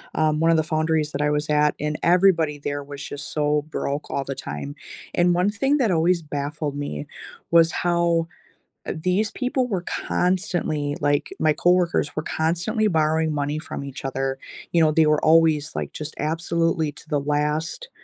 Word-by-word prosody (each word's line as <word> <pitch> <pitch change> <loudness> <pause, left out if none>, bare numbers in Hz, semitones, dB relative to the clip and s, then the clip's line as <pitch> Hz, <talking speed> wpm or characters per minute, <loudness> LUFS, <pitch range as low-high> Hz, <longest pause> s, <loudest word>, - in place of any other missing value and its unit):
um- 155 -1 +2
one 165 0 +4
of 165 - +4
the 160 - +2
foundries 155 -1 0
that 140 - -2
I 150 - +2
was 150 +1 -1
at- 150 0 +3
and 150 +1 -2
everybody 170 -4 +3
there 145 0 -3
was 140 0 -9
just 145 +1 -7
so 150 0 +1
broke 145 -1 -3
all 140 - -1
the 135 0 -4
time. 75 - -6 0.4
And 175 0 +4
one 180 +3 +2
thing 270 +7 +1
that 235 -7 +2
always 170 +1 +2
baffled 145 0 -4
me 75 - -4 0.4
was 165 0 +6
how, 170 -1 +1 0.6
uh, - - -1
these 185 +6 0
people 255 -1 -1
were 190 -6 -2 0.3
constantly 175 -6 0
like, 145 0 +1
my 155 -1 +3
coworkers 175 -4 +2
were 155 - -1
constantly 180 +9 0
borrowing 160 -2 +1
money 145 +1 -1
from 155 - -6
each 135 -1 -8
other. 135 0 -2 0.3
You 170 - +3
know, 155 - +4
they 155 0 +4
were 150 0 +2
always, 160 -2 +4
like, - - -3
just 155 0 -6
absolutely 165 0 0
to 155 - -15
the 145 - +1
last, 150 - -1
155 Hz, 180 wpm, -23 LUFS, 145-170 Hz, 0.6 s, was